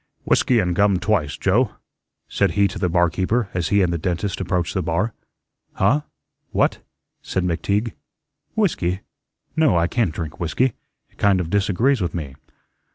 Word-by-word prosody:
"Whiskey 125 - +3
and 90 -5 +1
gum 100 0 +3
twice, 90 -7 0
Joe," 105 +5 +2 0.5
said - - +1
he 100 -1 +4
to 100 +1 -7
the 90 -2 +1
barkeeper 90 +6 +1
as 90 -2 -1
he 100 -1 +3
and 85 -1 +1
the 85 - -2
dentist 90 +4 -2
approached 90 -2 -1
the 95 - 0
bar. 90 +7 -1 0.6
"Huh? 125 +10 +2 0.5
What?" - - +1 0.4
said 95 - -2
McTeague. 100 +6 0 0.6
"Whiskey? 100 - 0 0.5
No, 155 - +4
I 85 - +3
can't 110 -1 0
drink 80 0 -6
whiskey. 110 +9 +1 0.4
It - - -30
kind 100 -2 +4
of 85 -2 -3
disagrees 105 +6 +2
with 85 -2 -2
me." 75 -6 -5
95 Hz, 160 wpm, -22 LUFS, 85-105 Hz, 0.6 s, he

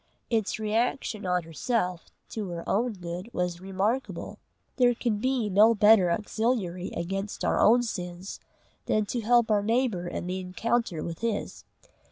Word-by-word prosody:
Its 220 -3 0
reaction 220 -1 -1
on 180 -1 +1
herself 180 - -2 0.2
to 215 -3 -5
her 170 -1 -6
own 235 +4 +1
good 180 +2 -6
was 180 -1 -2
remarkable. 195 +7 -2 0.4
There 245 -2 +4
can 230 -3 -1
be 255 -1 0
no 210 +4 +5
better 210 -3 +6
auxiliary 205 -2 -1
against 195 +4 -3
our - - +2
own 240 +3 +5
sins 180 -4 -5 0.5
than 215 -1 +2
to 240 +3 -2
help 235 0 +3
our 205 -1 +4
neighbour 220 -5 0
in 175 - -4
the 185 +1 -3
encounter 185 -1 -1
with 165 -1 -5
his. 230 -3 -3
205 Hz, 150 wpm, -27 LUFS, 180-230 Hz, 0.5 s, better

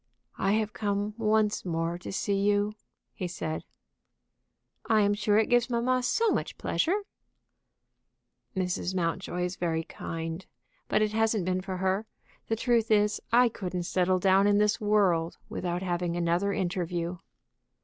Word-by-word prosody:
"I 195 - +2
have 215 -1 0
come 205 0 -1
once 215 -1 +2
more 170 0 -2
to - - -7
see 200 +1 -1
you," 205 +1 +2 0.4
he 185 - -4
said. 160 -2 -4 1.3
"I 220 -1 +5
am 205 0 +3
sure 205 0 +2
it 220 - +4
gives 245 0 +2
mamma 250 +2 +1
so 450 - +2
much - - -2
pleasure." 390 +6 0 1.6
"Mrs. 180 0 -1
Mountjoy 180 +1 -1
is 180 +1 -3
very 165 -2 -1
kind. 165 +2 -5 0.4
But - - +2
it 215 - 0
hasn't 220 -3 +1
been 185 0 0
for 185 -1 -4
her. 190 +3 0 0.4
The 225 - +1
truth 230 -1 +1
is, 210 -1 +3
I 245 +1 +6
couldn't 180 -5 -4
settle 185 +1 +1
down 195 +2 +4
in 205 0 +4
this 210 +2 +2
world 190 -6 +2
without 180 0 -3
having 175 -1 -1
another 175 +3 +1
interview." 180 -2 -2
195 Hz, 150 wpm, -28 LUFS, 180-215 Hz, 1.6 s, I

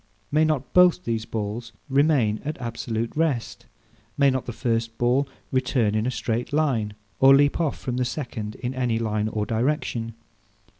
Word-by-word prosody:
May 155 +2 +4
not 145 -5 -1
both 180 0 +5
these 115 -5 -2
balls 115 +2 -4
remain 135 -6 +2
at 150 +1 -4
absolute 115 -1 -3
rest? 150 -7 -1 0.5
May 140 -1 +5
not 130 0 -2
the - - -2
first 115 -1 -2
ball 130 +3 +2 0.2
return 125 -5 +1
in 110 +2 0
a - - +2
straight 120 0 -2
line, 130 -9 0 0.2
or 135 +1 +8
leap 145 +2 +3
off 155 -4 0
from 125 -1 -4
the 125 - +1
second 115 -6 -5
in 125 +1 -4
any 125 -3 0
line 110 -2 -1
or 105 -1 -2
direction? 115 -1 -1
120 Hz, 165 wpm, -24 LUFS, 115-140 Hz, 0.5 s, or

